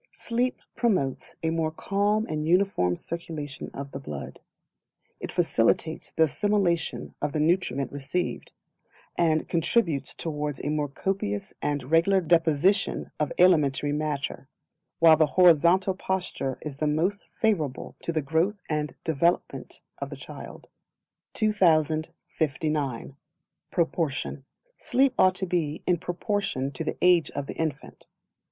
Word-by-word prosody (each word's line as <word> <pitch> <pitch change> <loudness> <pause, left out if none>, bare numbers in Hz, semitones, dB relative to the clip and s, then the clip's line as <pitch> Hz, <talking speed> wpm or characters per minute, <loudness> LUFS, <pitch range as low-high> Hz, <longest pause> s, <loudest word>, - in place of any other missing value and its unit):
Sleep 245 +2 -1 0.2
promotes 185 - 0
a 160 - +1
more 165 -1 0
Calm 205 +6 0
and 155 -3 -3
Uniform 175 - +2
Circulation 155 -4 -6
of 140 0 -7
the 135 - -6
blood; 75 - -7 0.8
it - - -5
facilitates 160 0 +1
the 160 - +2
assimilation 185 -1 0
of 145 0 -1
the 155 - 0
nutriment 155 -5 +1
received, 145 +6 -3 0.6
and 160 -2 +2
contributes 165 - 0
towards 150 -3 -3
a - - -1
more 150 -1 0
copious 135 - -3
and 145 -2 -2
regular 170 +4 +4
deposition 165 +2 +2
of 150 - 0
alimentary 150 -5 +4
matter, 145 -2 -3 0.5
while 165 -1 +7
the 155 0 +3
horizontal 180 +2 +5
posture 185 -8 -3
is 145 -3 -6
the 155 - 0
most 175 +7 0
favourable 160 - 0
to - - -2
the 155 -2 -1
growth 165 +8 +1
and 150 -1 -2
development 170 +2 -1 0.2
of - - -4
the - - -7
child. - - -10 0.7
2059. 155 - 0 0.5
Proportion. 160 -5 -1 0.3
Sleep 265 +1 +2
ought 185 0 +5
to 190 - -2
be 165 -4 -2
in 175 -2 +2
Proportion 175 - -2
to 140 +4 -5
the - - -3
age 180 -2 +5
of 140 0 -2
the - - -6
infant. 155 -3 -4
160 Hz, 130 wpm, -26 LUFS, 145-180 Hz, 0.8 s, while